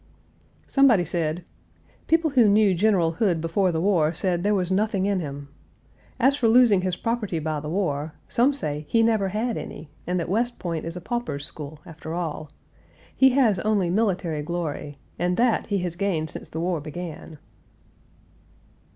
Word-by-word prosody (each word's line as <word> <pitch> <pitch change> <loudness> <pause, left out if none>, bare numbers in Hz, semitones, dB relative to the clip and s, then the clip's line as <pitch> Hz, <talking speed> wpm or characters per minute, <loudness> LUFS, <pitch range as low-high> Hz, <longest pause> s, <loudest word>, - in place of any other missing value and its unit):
Somebody 250 -10 +4
said: 165 0 -1 0.6
"People 325 -1 +2
who 245 -6 +5
knew 205 -1 +4
General 180 -3 +2
Hood 175 -1 +1
before 170 +3 +1
the 160 - -1
war 170 -4 +2
said 175 0 0
there 205 +2 +2
was 185 -2 -1
nothing 195 0 +1
in 200 -1 +1
him. 140 -3 -6 0.7
As 265 +3 +4
for 250 -5 +1
losing 225 -4 +5
his 185 -1 -1
property 230 -6 -2
by 155 -1 -2
the 150 +1 -6
war, 155 -4 -2
some 250 +4 +3
say 150 - -4
he 230 -1 +3
never 220 -3 +2
had 220 +4 -2
any, 150 - -8 0.2
and 180 +1 0
that 170 - -3
West 235 +6 0
Point 170 -3 -4
is 165 +1 -5
a - - -7
pauper's 240 -10 -3
school, 155 -2 -7
after 160 0 -7
all. 155 -3 -4 0.7
He 265 - +6
has 235 -9 +3
only 200 -3 +1
military 180 -7 0
glory, 150 -3 -4 0.2
and 180 +1 0
that 240 -1 +2
he 205 - 0
has 170 -1 -4
gained 175 -5 -1
since - - -8
the 160 - -5
war 175 -2 -1
began." 160 0 -8
180 Hz, 170 wpm, -24 LUFS, 160-215 Hz, 0.7 s, He